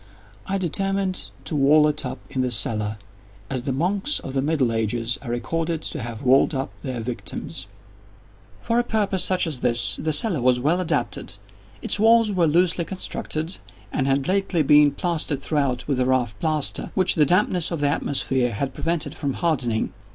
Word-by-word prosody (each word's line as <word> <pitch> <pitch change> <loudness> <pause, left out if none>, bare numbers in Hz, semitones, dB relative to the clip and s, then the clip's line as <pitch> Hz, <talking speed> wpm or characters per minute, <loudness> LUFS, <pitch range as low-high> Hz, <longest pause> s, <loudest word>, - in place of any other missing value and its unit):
I 195 0 -1
determined 195 +1 -1 0.2
to 160 - -2
wall 150 +2 +5
it 150 0 -2
up - - -6
in 130 - -1
the 130 - 0
cellar—as 105 0 -3
the 135 - -3
monks 190 - 0
of 130 - -7
the 135 - 0
middle 140 -5 +1
ages 115 +2 -1
are 135 - -8
recorded 160 +7 -2
to 150 - -5
have 115 +1 -7
walled 135 +3 +4
up 135 0 -4
their 130 -4 -5
victims. 120 +1 -5 1.0
For 235 0 +1
a - - +2
purpose 205 -5 +1
such 185 -1 +2
as 155 -6 -3
this 120 -2 +3
the 160 - -2
cellar 175 - +3
was 125 0 +3
well 160 +8 +1
adapted. 160 - -2 0.5
Its - - +2
walls 225 0 +5
were 180 -4 +2
loosely 175 +2 +2
constructed, 170 -2 -3 0.3
and 135 -2 0
had 135 0 +1
lately 190 -4 +1
been 150 +1 +6
plastered 160 -1 -2
throughout 140 -5 -1
with 140 -3 0
a 125 - +2
rough 130 -4 +1
plaster, 155 -3 -1
which 185 -1 +3
the 155 - +4
dampness 180 0 +2
of 170 - -3
the 145 -1 +1
atmosphere 130 -4 0
had 130 +6 -3
prevented 155 -1 -2
from 140 -4 -3
hardening. 125 -10 -1
145 Hz, 175 wpm, -23 LUFS, 125-175 Hz, 1.0 s, been